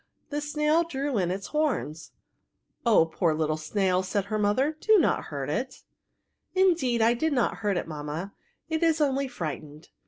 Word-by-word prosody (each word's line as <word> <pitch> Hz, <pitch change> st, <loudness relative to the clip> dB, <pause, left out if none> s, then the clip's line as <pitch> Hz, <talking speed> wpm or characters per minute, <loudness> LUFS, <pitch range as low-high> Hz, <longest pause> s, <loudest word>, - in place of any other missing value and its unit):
The 295 Hz, +1 st, -2 dB
snail 300 Hz, +2 st, +2 dB
drew 280 Hz, -6 st, -2 dB
in 180 Hz, -2 st, 0 dB
its 195 Hz, +2 st, -3 dB
horns. 260 Hz, -, -1 dB, 0.4 s
" -, -, -46 dB
Oh, 215 Hz, -8 st, +6 dB
poor 165 Hz, 0 st, 0 dB
little 155 Hz, 0 st, 0 dB
snail,'* 185 Hz, +4 st, 0 dB
said 190 Hz, +1 st, -2 dB
her 215 Hz, +1 st, -2 dB
mother, 255 Hz, +9 st, +1 dB
do 435 Hz, +4 st, +5 dB
not 355 Hz, -, +2 dB
hurt -, -, -5 dB
it." -, -, -3 dB, 0.4 s
" -, -, -52 dB, 0.3 s
Indeed, 315 Hz, -12 st, +3 dB
I 230 Hz, +1 st, +5 dB
did 310 Hz, +6 st, 0 dB
not 245 Hz, -3 st, +1 dB
hiut 205 Hz, -3 st, 0 dB
it, -, -, -3 dB
mammaj 155 Hz, +4 st, -5 dB, 0.4 s
it 320 Hz, 0 st, -2 dB
is 325 Hz, -2 st, +3 dB
only 275 Hz, -2 st, +1 dB
frightened. 155 Hz, -, -7 dB
225 Hz, 180 wpm, -27 LUFS, -, 0.4 s, Oh